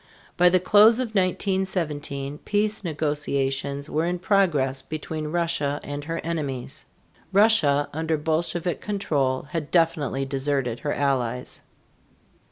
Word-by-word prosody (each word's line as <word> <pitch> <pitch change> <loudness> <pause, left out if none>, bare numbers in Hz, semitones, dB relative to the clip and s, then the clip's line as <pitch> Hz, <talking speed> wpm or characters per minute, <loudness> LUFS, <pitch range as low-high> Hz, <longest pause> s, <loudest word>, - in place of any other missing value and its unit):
By 180 0 +6
the 185 +1 +4
close 210 +5 +6
of 255 -3 -1
1917 170 -7 -1
peace 210 0 0
negotiations 140 -3 -2
were 160 +2 0
in 180 +1 -1
progress 165 -9 +1
between 155 0 -5
Russia 155 -3 0
and 145 0 -5
her 165 +1 -3
enemies. 145 -7 -3 0.5
Russia 185 -9 +4
under 160 +1 -1
Bolshevik 165 +3 -1
control 145 -11 -1
had 160 -3 -3
definitely 160 -5 +1
deserted 135 -3 -1
her 145 - -2
allies. 125 -3 -1
155 Hz, 115 wpm, -24 LUFS, 140-180 Hz, 0.5 s, By